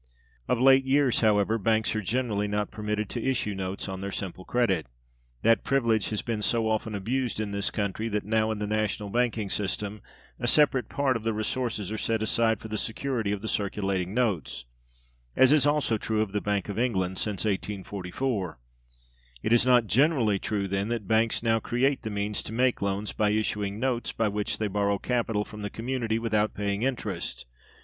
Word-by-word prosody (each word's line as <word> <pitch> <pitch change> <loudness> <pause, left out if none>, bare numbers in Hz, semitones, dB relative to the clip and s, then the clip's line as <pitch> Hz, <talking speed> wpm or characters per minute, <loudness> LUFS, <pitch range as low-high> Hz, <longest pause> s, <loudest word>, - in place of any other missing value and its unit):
Of 125 - +1
late 135 +1 +6
years, 135 -2 +3
however, 110 0 +3
banks 110 +1 +1
are 110 - 0
generally 105 -1 -1
not 105 0 -1
permitted 105 0 -2
to 120 - -4
issue 120 -6 0
notes 95 +1 -4
on 95 0 -5
their 100 0 -4
simple 95 -1 -5
credit. 105 -10 +1 0.6
That 115 0 +4
privilege 115 -6 +2
has 105 - -2
been 115 -3 -2
so 115 +1 +1
often 110 0 -1
abused 120 +4 -1
in 105 -2 -2
this 100 0 -1
country 105 +2 -2
that 105 -2 -2
now, 110 +1 +1
in 110 - -1
the 105 - -2
national 105 -1 -1
banking 115 -4 0
system, 105 +1 -2 0.4
a 120 - -1
separate 135 -2 +3
part 140 -3 +1
of 115 - -2
the 115 0 0
resources 110 -2 -2
are 110 - -3
set 110 0 0
aside 110 0 +2
for - - -8
the 110 -1 -3
security 115 -3 -2
of 105 0 -3
the - - -3
circulating 95 -3 -1
notes 95 - -1 0.7
(as 130 0 +6
is 145 -2 +5
also 145 -7 +1
true 110 0 0
of 105 - -7
the 105 0 -1
Bank 100 -2 -1
of 105 +1 -3
England 95 -7 0
since 105 -1 -1
1844). 100 - -2 0.9
It 110 - +2
is 120 +1 +4
not 125 -2 +5
generally 115 - +3
true, 100 -1 -2
then, 100 +1 -1
that 115 -4 -3
banks 115 +1 +2
now 115 -1 +3
create 130 +5 +1
the 110 - -4
means 105 0 -1
to - - -8
make 125 +2 +1
loans 100 +1 -1
by 105 -1 +2
issuing 105 -1 -1
notes 125 -1 -1
by 115 -2 +1
which 105 0 -2
they 110 - -1
borrow 100 0 +1
capital 115 -2 -1
from 105 0 -10
the 105 - -3
community 115 -1 -2
without 110 -2 0
paying 100 0 -1
interest. 110 - -3
110 Hz, 190 wpm, -27 LUFS, 100-120 Hz, 0.9 s, late